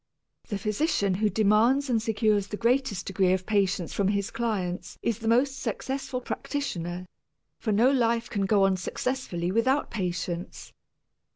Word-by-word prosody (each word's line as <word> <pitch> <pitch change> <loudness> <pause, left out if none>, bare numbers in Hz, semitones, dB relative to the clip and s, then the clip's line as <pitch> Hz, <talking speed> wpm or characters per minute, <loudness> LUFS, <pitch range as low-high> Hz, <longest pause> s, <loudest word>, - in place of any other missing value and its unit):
The 205 - -2
physician 210 - 0
who 210 +3 +1
demands 220 +7 +3
and 235 -4 +1
secures 215 -2 +1
the 210 - -5
greatest 240 -3 +1
degree 190 -1 +2
of 185 -1 -1
patience 195 -4 0
from 200 - +1
his 200 -1 0
clients 195 -7 -3
is 230 -2 0
the 225 - -4
most 260 +4 +2
successful 265 -1 -3
practitioner, 180 - -4 0.5
for 220 - -1
no 230 +6 +4
life 235 -3 +1
can 200 -2 -1
go 200 -1 +4
on 195 -1 +3
successfully 180 -3 -2
without 260 +7 +1
patience. 180 -3 -4
215 Hz, 150 wpm, -27 LUFS, 190-240 Hz, 0.5 s, no